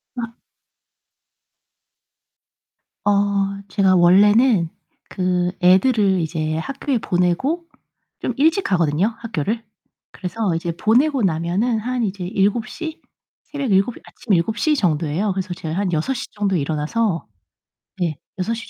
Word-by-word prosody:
아. 235 -1 -5 2.7
어 205 - +4 0.6
제가 190 -1 +3
원래는 200 +2 +5 0.4
그 180 -1 0
애들을 190 +1 +4
이제 155 -1 -2
학교에 270 - -2
보내고 185 - 0 0.6
좀 - - -2
일찍 320 +7 +3
가거든요, 175 +4 +1
학교를. 225 0 -3 0.5
그래서 190 0 -2
이제 170 +1 -2
보내고 250 - +2
나면은 185 +7 0
한 250 +2 -2 0.2
7:00? 215 - -2 0.4
새벽 280 -5 -4
7, 195 +5 +2
아침 220 - -3
7:00 220 - +2
정도예요. 170 - 0
그래서 185 -1 -3
제가 160 -1 -5
한 195 -1 0
6:00 245 +12 -1
정도에 200 -4 0
일어나서 160 +6 -1 0.7
네, 165 -5 -1 0.2
6:00 230 +5 -3
195 Hz, 200 characters per minute, -21 LUFS, 175-235 Hz, 2.7 s, 원래는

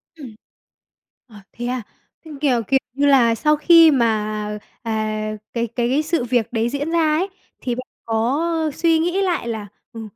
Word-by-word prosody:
Ừm. 265 -9 -11 0.9
Ờ, 225 - -17 0.2
thế 240 - -7
à. 250 0 -2 0.4
Ừm, 300 -3 -10
kiểu, 265 -5 +2
kiểu 270 - +3
như 280 +2 0
là, 245 -5 +5
sau 300 +6 +2
khi 330 +1 +6
mà, 215 -4 0 0.2
à, 215 -1 -2 0.2
cái 235 0 -1
cái 245 +5 0
sự 325 -3 -1
việc 240 -1 -1
đấy 230 0 0
diễn 285 +4 -3
ra 335 - +2 0.2
ấy, 375 +4 -1 0.3
thì 245 -2 -2
bạn 255 +1 -7 0.2
có 230 +6 0 0.3
suy 330 -1 +2
nghĩ 350 +4 0
lại 355 -10 -1
là 220 -3 -4 0.3
"Ừ, 225 - -7
245 Hz, 170 wpm, -20 LUFS, 225-300 Hz, 0.9 s, khi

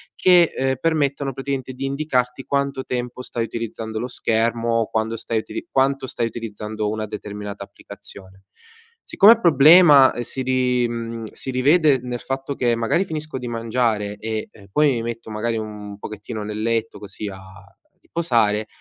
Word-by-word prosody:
che, 180 -2 +5
ehm, 130 0 0
permettono 140 -3 0
praticamente 135 -1 -4
di 130 - -7
indicarti 135 -3 -1
quanto 140 -1 -1
tempo 125 0 -4
stai 115 -2 -3
utilizzando 110 -1 -5
lo 125 - -3
schermo 115 -1 0
o 115 - -1
quando 110 +1 -1
stai 115 0 -2
utili 335 - -7
quanto 135 0 +1
stai 115 -1 -2
utilizzando 110 -2 -5
una 110 0 -3
determinata 105 -1 -7
applicazione. 95 -1 -13 0.6
Siccome 205 +3 +6
il 230 - -7
problema, 150 - +7
uhm, 120 - -3
si 130 +2 -5
ri 125 -1 +1
mhmm, 115 -1 -5
si 130 - -6
rivede 140 +2 +4
nel 125 -1 -4
fatto 135 +1 -4
che 120 -2 +1
magari 115 +10 +1
finisco 155 -5 -5
di 125 - -6
mangiare 115 -3 -1
e, 110 0 -4
ehm, 100 -1 -17
poi 150 +5 +4
mi 120 -3 -1
metto 115 -1 -6
magari 115 +2 -2
un 105 -2 -7
pochettino 110 +1 -7
nel 105 +1 -5
letto 115 0 -1
così 100 +1 -8
a 95 -1 -7 0.6
riposare, 110 -10 0
120 Hz, 165 wpm, -22 LUFS, 110-135 Hz, 0.6 s, problema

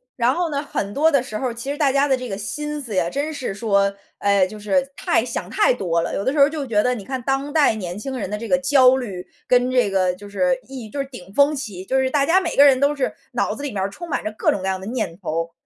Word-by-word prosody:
然 245 +1 +2
后 350 -2 -1
呢， 285 -1 -2
很 200 -8 -3
多 310 +7 +3
的 280 -4 +3
时 215 -4 -5
候， 250 -1 -2
其 240 +4 -5
实 290 - -4
大 285 -3 +3
家 280 +1 +2
的 265 - +2
这 255 0 -6
个 200 - -4
心 295 +9 -4
思 230 -6 -6
呀， 180 -2 +2
真 290 - -2
是 260 -8 -4
说， 200 -2 +1 0.2
哎， 200 -2 +3
就 215 +2 -10
是 270 +6 0
太 - - +1
想 - - -4
太 420 - +3
多 175 -8 0
了。 165 - -3
有 200 - -2
的 260 - +2
时 295 - -1
候 280 +1 +7
就 300 -2 -4
觉 220 -5 +2
得 250 +3 +1
你 205 -5 -8
看 260 -2 -4
当 270 +3 -1
代 295 -8 +4
年 185 -2 -5
轻 265 +4 -5
人 215 - -3
的 210 - -3
这 230 - -6
个 270 - +3
焦 270 -1 +5
虑 195 -8 -6 0.2
跟 250 0 +3
这 250 -6 +2
个 185 -2 +2
就 205 +2 -12
是 260 +6 +1
一 255 -5 -8
就 280 - -6
是 275 - -1
顶 220 -9 -12
风 285 +1 +4
起， 200 -9 -6
就 265 +4 +1
是 260 0 +1
大 280 +1 +2
家 360 +6 +4
每 345 -3 -3
个 285 - +7
人 270 -2 +5
都 285 +2 +2
是 275 - -1 0.2
脑 - - 0
子 - - -8
里 285 -2 -3
面 195 -2 -2
儿 - - 0
充 340 - -9
满 - - -1
着 215 - -3
各 - - +1
种 200 - -2
各 - - -5
样 190 -1 -1
的 190 - -7
念 220 -8 -3
头。 165 -2 -3
255 Hz, 320 characters per minute, -21 LUFS, 200-280 Hz, 0.2 s, 候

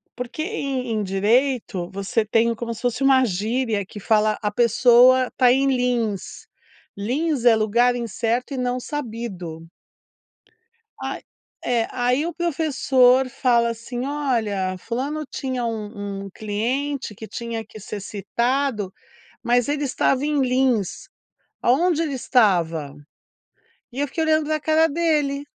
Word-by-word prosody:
porque 250 +5 -5
em 275 - -3
em 215 -2 -1
direito 205 0 +1
você 200 +3 -1
tem 230 +2 +2
como 230 +1 -4
se - - -10
fosse 245 +2 -1
uma 265 -1 +5
gíria 215 +1 -1
que 205 - -10
fala: 215 +1 +2
a 210 - 0
pessoa 245 +3 +5
está 250 0 +3
em 270 +2 +3
lins, 245 -6 -1 0.5
lins 260 +5 -1
é 235 -2 +7
lugar 235 +3 +2
incerto 235 +3 -2
e - - -5
não 250 0 -1
sabido. 220 - -6 1.3
Ah - - -4 0.4
é 235 -2 +1
aí 250 +5 +1
o 340 - -4
professor 265 -6 +3
fala 240 -2 +2
assim: 240 +2 -5
"Olha 225 -10 -1
fulano 275 +9 -3
tinha 260 -2 -3
um 205 -3 -5
um 195 - -8
cliente 240 +6 -3
que 220 - -9
tinha 230 -1 -5
que 215 - -13
ser 210 +1 -6
citado, 220 +2 -1 0.5
mas 245 0 +2
ele 290 0 -1
estava 270 0 +1
em 300 -1 +1
lins, 255 -6 0 0.6
aonde 330 +6 +3
ele 300 -4 -2
estava?". 170 - +1 1.0
E 260 - -5
eu 290 - +1
fiquei 320 +4 -2
olhando 310 -1 +2
pra 310 0 -1
cara 315 +1 +3
dele, 295 -3 0
245 Hz, 135 wpm, -22 LUFS, 215-275 Hz, 1.3 s, é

